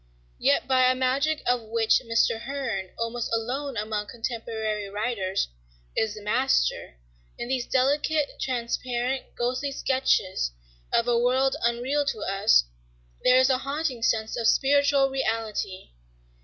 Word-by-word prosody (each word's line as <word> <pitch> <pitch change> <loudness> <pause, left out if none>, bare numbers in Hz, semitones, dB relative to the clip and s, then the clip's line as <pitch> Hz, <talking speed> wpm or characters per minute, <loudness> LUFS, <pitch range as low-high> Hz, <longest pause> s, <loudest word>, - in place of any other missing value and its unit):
Yet - - +2
by 255 -1 +4
a 255 - +2
magic 275 +4 0
of 245 0 +2
which 225 0 +2
Mr. 230 -1 +1
Hearn, 235 -10 -3
almost 230 0 -3
alone 250 +4 -2
among 210 0 -2
contemporary 220 -2 -4
writers, 205 - -1 0.5
is 220 -1 0
the 210 - -10
master, - - +1 0.4
in 240 - -5
these 255 -2 -1
delicate, 290 +3 +1
transparent, 250 +1 -2
ghostly 255 +3 -1
sketches 230 - 0 0.4
of 235 - +2
a 240 -1 +3
world 260 +3 +2
unreal 245 +5 +1
to 220 -6 -2
us, 195 - +4 0.6
there 250 0 +6
is 260 +1 +5
a 255 - +2
haunting 275 -2 -3
sense 220 -1 0
of 230 -2 0
spiritual 280 +1 +4
reality. 225 - -3
240 Hz, 130 wpm, -26 LUFS, 220-265 Hz, 0.6 s, there